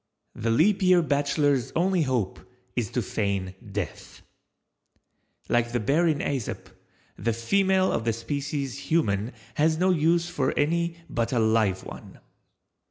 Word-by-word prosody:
The 115 - -3
Leap 185 - +3
Year 180 -2 +5
Bachelor's 145 -3 +1
only 185 +1 +2
hope 125 -9 -1 0.4
is - - -1
to - - -1
feign 100 -3 -2 0.2
death. 100 -3 -6 1.2
Like 120 0 +1
the 120 - +1
Bear 145 +10 +2
in 155 -3 +2
Æsop, 135 -5 -3 0.5
the 115 - 0
Female 190 - +2
of 115 - -1
the 115 - +1
Species 140 +2 -3
Human 110 -9 +1 0.3
has 155 +1 +3
no 185 +2 +3
use 170 +1 +2
for 145 -7 -1
any 170 +3 +1
but 115 -1 -1
a 125 - 0
"live 110 -4 +2
one." - - -11
140 Hz, 140 wpm, -26 LUFS, 115-170 Hz, 1.2 s, Year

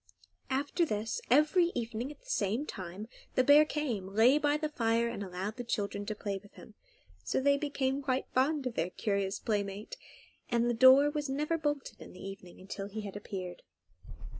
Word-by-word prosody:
After 280 +6 0
this, 220 -6 -2
every 305 +7 +4
evening 235 +2 -3
at 300 - -13
the - - -27
same 230 - 0
time 190 - -7 0.3
the 255 - +4
bear 290 +3 +7
came, 255 -12 -2
lay 225 +8 +5
by 295 0 +2
the 305 0 -2
fire, 230 -4 +1
and 235 -3 -4
allowed 190 +4 -5
the 245 - -4
children 205 -3 -2
to 215 - -2
play 200 -1 -3
with 205 - -19
him; 220 - -14 0.5
so - - 0
they 280 +1 +4
became 280 -2 -1
quite 260 -1 0
fond 275 +2 +2
of 250 - -2
their 170 -4 -1
curious 200 0 -1
playmate, 205 - -3 0.5
and 235 -1 +2
the 240 - +2
door 260 +4 +7
was 295 -2 -3
not 275 +2 -1
ever 330 +2 0
bolted 290 -2 -3
in - - -11
the 180 - -13
evening 195 -2 -9
until 195 +1 -6
he 215 +2 -5
had 200 -2 -7
appeared. 185 -3 -6
235 Hz, 190 wpm, -31 LUFS, 200-285 Hz, 0.5 s, bear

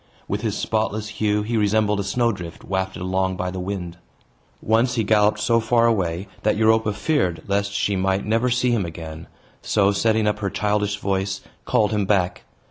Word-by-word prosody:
With - - -2
his - - -2
spotless 110 -1 -1
hue, 105 -1 0
he 115 +2 -1
resembled 105 0 +2
a - - 0
snow 115 +4 +1
drift, 85 -5 -8
wafted 95 -1 -3
along 95 0 0
by 90 0 -2
the 95 - -5
wind. 90 -2 -5 0.6
Once 115 +3 +2
he 115 - +1
galloped 105 0 +3
so 115 +2 +3
far 115 +1 +2
away 95 -5 0
that 105 0 +1
Europa 110 0 +3
feared 100 - 0
lest 100 0 0
she 100 0 0
might 95 +1 0
never 115 +4 +1
see 125 0 +1
him 115 -4 +1
again; 80 -1 -7 0.3
so, 100 -2 +2
setting 110 +2 +1
up 105 0 0
her 100 -2 -1
childish 105 0 0
voice, 95 -1 -2 0.2
called 105 -1 +2
him 105 -2 0
back. 95 -3 0
105 Hz, 185 wpm, -22 LUFS, 95-110 Hz, 0.6 s, galloped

